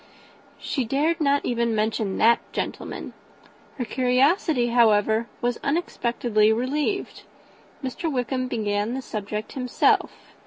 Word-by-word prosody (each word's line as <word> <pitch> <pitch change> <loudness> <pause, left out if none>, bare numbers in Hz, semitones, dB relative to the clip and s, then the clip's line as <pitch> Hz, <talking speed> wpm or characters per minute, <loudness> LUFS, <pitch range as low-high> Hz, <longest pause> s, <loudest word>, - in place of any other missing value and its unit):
She 265 - -2
dared 295 +8 0
not 285 -1 +2
even 235 -2 0
mention 215 -2 -1
that 230 +1 +5
gentleman. - - -5 0.6
Her 250 - -2
curiosity, 255 - +2
however, 220 -1 +3
was 240 0 -1
unexpectedly 240 -8 +1
relieved. 290 - -1 0.6
Mr. 310 +5 -3
Wickham 255 0 -1
began 210 0 -1
the 265 - -4
subject 210 -1 -5
himself. 250 -2 +1
245 Hz, 110 wpm, -24 LUFS, 220-270 Hz, 0.6 s, that